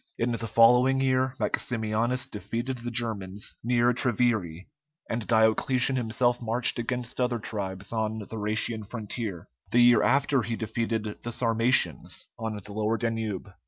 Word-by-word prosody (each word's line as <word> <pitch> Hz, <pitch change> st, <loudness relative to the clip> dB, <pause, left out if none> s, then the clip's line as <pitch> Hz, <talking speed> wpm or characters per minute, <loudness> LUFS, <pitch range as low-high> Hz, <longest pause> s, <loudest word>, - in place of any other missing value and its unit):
In 120 Hz, +1 st, 0 dB
the 115 Hz, -1 st, -2 dB
following 125 Hz, +4 st, +5 dB
year 130 Hz, -1 st, +1 dB
Maximianus 120 Hz, +2 st, -1 dB
defeated 120 Hz, +2 st, -4 dB
the 120 Hz, 0 st, -5 dB
Germans 105 Hz, -4 st, -4 dB
near 120 Hz, +1 st, +3 dB
Treviri, 110 Hz, -8 st, 0 dB, 0.4 s
and 115 Hz, -1 st, -3 dB
Diocletian 120 Hz, +4 st, +3 dB
himself 120 Hz, 0 st, +1 dB
marched 120 Hz, +1 st, +2 dB
against 125 Hz, +1 st, -3 dB
other 125 Hz, -1 st, +1 dB
tribes 100 Hz, -2 st, -4 dB
on 110 Hz, -1 st, -1 dB
the 105 Hz, -, -6 dB
Rhætian 110 Hz, +1 st, -1 dB
frontier; 110 Hz, -5 st, -5 dB, 0.2 s
the 120 Hz, -, +4 dB
year 120 Hz, -2 st, +6 dB
after 140 Hz, +2 st, +3 dB
he 115 Hz, +1 st, -3 dB
defeated 110 Hz, -1 st, -3 dB
the 120 Hz, -, -5 dB
Sarmatians 115 Hz, +1 st, +1 dB
on 110 Hz, -1 st, -3 dB
the 105 Hz, 0 st, -9 dB
lower 110 Hz, +2 st, 0 dB
Danube. 110 Hz, -4 st, -3 dB
115 Hz, 140 wpm, -27 LUFS, 110-125 Hz, 0.4 s, year